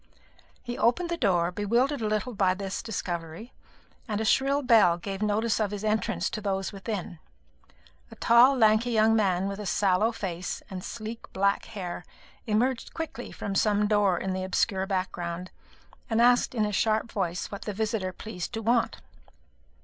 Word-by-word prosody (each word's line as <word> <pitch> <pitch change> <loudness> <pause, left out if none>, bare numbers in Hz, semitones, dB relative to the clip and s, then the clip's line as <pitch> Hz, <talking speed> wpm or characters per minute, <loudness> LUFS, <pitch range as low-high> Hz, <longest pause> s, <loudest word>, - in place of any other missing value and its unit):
He 240 0 -5
opened 340 +9 +2
the 340 - 0
door, 180 - +1
bewildered 235 +8 +1
a 215 - 0
little 215 +4 -1
by 190 -3 +2
this 195 0 -4
discovery, 175 0 -5 0.5
and 210 -2 -2
a 220 - -1
shrill 275 +5 +2
bell 215 -8 +5
gave 195 +3 -6
notice 215 +2 +1
of 215 -2 +1
his 205 0 -5
entrance 220 +1 0
to 215 - -4
those 195 -1 -2
within. 195 -4 -5 0.9
A - - -12
tall 245 +4 +5
lanky 220 +1 +4
young 225 -1 +4
man, 190 -3 +1
with 200 +1 -4
a 210 - -5
sallow 200 +4 +2
face 185 -6 -5
and 185 -1 -6
sleek 225 +1 -7
black 200 +1 +1
hair, 180 -5 -6 0.4
emerged 235 +3 0
quickly 325 -2 -5
from 200 - -5
some 210 +1 +2
door 205 -3 +3
in 190 +1 -2
the 185 0 -3
obscure 190 +1 0
background, 180 -2 -3 0.6
and 225 -1 +1
asked 245 +1 +4
in 215 -2 +2
a 210 - -2
sharp 220 +2 +1
voice 180 -3 -2
what 200 - -6
the 210 - -2
visitor 215 -2 -1
pleased 185 +1 -7
to 225 -1 -4
want. 235 +1 +1
210 Hz, 170 wpm, -27 LUFS, 190-230 Hz, 0.9 s, bell